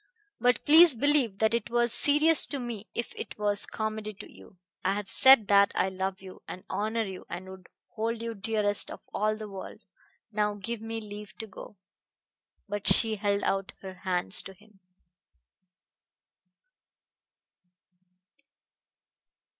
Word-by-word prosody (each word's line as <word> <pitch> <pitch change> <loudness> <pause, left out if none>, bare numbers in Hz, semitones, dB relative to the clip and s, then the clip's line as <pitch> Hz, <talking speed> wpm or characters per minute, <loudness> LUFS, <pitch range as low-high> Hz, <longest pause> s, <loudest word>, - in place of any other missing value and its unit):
But 245 +1 +1
please 320 -1 +7
believe 265 -5 +1
that 220 +1 +1
it 235 -1 -2
was 240 0 +2
serious 300 +2 +4
to 285 - -5
me 235 -4 -6
if 235 - -4
it - - -8
was 205 -1 0
comedy 215 -1 -5
to - - -12
you. 185 - -17 0.3
I 195 +2 +1
have 205 -1 -5
said 260 -3 +6
that 200 0 +5
I 190 - +1
love 190 0 -4
you 185 -1 -12
and 185 - -8
honor 220 +2 -1
you 190 -3 -9
and 180 +2 -7
would 190 0 -12 0.2
hold 230 +1 -3
you 230 0 -5
dearest 205 0 +1
of - - -9
all 215 +1 0
the 215 -1 -7
world. 195 -2 -10 0.5
Now 210 -1 -1
give 220 +3 -5
me 225 0 -5
leave 210 0 -10
to 220 - -6
go." 205 0 -12 0.9
But 205 0 -4
she 220 -2 +4
held 200 0 -1
out 195 0 -2
her 190 -1 -7
hands 185 0 +2
to 195 - -10
him. 210 +1 -24
210 Hz, 145 wpm, -28 LUFS, 195-230 Hz, 0.9 s, please